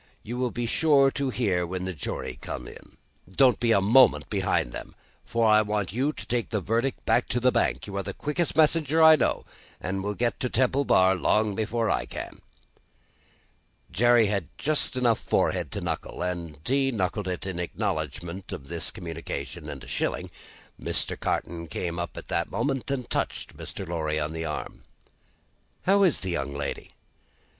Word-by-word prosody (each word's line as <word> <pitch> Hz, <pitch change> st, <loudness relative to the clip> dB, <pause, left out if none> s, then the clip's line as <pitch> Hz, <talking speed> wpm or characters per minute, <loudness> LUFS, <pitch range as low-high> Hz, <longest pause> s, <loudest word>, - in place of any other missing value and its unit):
You 120 Hz, +3 st, -5 dB
will 125 Hz, 0 st, 0 dB
be 120 Hz, 0 st, -3 dB
sure 140 Hz, +2 st, +4 dB
to 140 Hz, -1 st, -1 dB
hear 95 Hz, -9 st, 0 dB
when 90 Hz, +1 st, -4 dB
the 95 Hz, -, -3 dB
jury 65 Hz, -4 st, -5 dB
come -, -, -6 dB
in. -, -, -13 dB, 0.3 s
Don't 125 Hz, +4 st, +4 dB
be 120 Hz, -1 st, +2 dB
a 100 Hz, -, +5 dB
moment 120 Hz, +6 st, +5 dB
behind -, -, +1 dB
them, -, -, -8 dB, 0.3 s
for 115 Hz, -2 st, 0 dB
I 110 Hz, -1 st, +6 dB
want 105 Hz, -4 st, -2 dB
you 135 Hz, +6 st, +1 dB
to -, -, -8 dB
take 120 Hz, -1 st, -1 dB
the 105 Hz, -, 0 dB
verdict 115 Hz, +7 st, -1 dB
back 120 Hz, -, +3 dB
to 125 Hz, -, 0 dB
the 125 Hz, +1 st, +4 dB
bank. -, -, +1 dB
You 100 Hz, -, -7 dB
are -, -, 0 dB
the 95 Hz, -, -6 dB
quickest 150 Hz, +3 st, -1 dB
messenger 160 Hz, 0 st, +4 dB
I 160 Hz, 0 st, +10 dB
know, 145 Hz, -, 0 dB, 0.3 s
and 95 Hz, +2 st, -3 dB
will 105 Hz, +1 st, -2 dB
get 120 Hz, +1 st, 0 dB
to 125 Hz, -, -1 dB
Temple 130 Hz, +4 st, +2 dB
Bar 95 Hz, -4 st, +5 dB
long 105 Hz, +3 st, +2 dB
before 110 Hz, +2 st, 0 dB
I -, -, 0 dB
can." -, -, -7 dB, 1.5 s
Jerry 120 Hz, +4 st, +5 dB
had 100 Hz, -5 st, -1 dB
just 150 Hz, -3 st, +1 dB
enough 120 Hz, -3 st, +3 dB
forehead -, -, 0 dB
to -, -, -3 dB
knuckle, -, -, -3 dB
and 85 Hz, -4 st, -4 dB
he 135 Hz, +1 st, +2 dB
knuckled 100 Hz, -2 st, -1 dB
it 90 Hz, +1 st, -3 dB
in 95 Hz, -3 st, -4 dB
acknowledgment 90 Hz, +1 st, -3 dB
of 70 Hz, -, -7 dB
this 85 Hz, -1 st, -3 dB
communication 80 Hz, -5 st, -6 dB
and -, -, -7 dB
a -, -, -11 dB
shilling. -, -, -2 dB, 0.5 s
Mr. -, -, -1 dB
Carton 85 Hz, 0 st, -2 dB
came 85 Hz, +1 st, -3 dB
up 85 Hz, -, -5 dB
at -, -, -8 dB
the -, -, +1 dB
moment, 130 Hz, +5 st, -1 dB
and 130 Hz, -3 st, -2 dB
touched -, -, -2 dB
Mr. 95 Hz, -, -7 dB
Lorry 80 Hz, -3 st, -1 dB
on 75 Hz, +1 st, -2 dB
the 80 Hz, 0 st, -3 dB
arm. 75 Hz, -, -5 dB, 1.0 s
"How 200 Hz, +2 st, +4 dB
is 185 Hz, -6 st, +3 dB
the 95 Hz, -, -3 dB
young 70 Hz, -4 st, -2 dB
lady?" 70 Hz, -, -5 dB
105 Hz, 185 wpm, -27 LUFS, 90-125 Hz, 1.5 s, I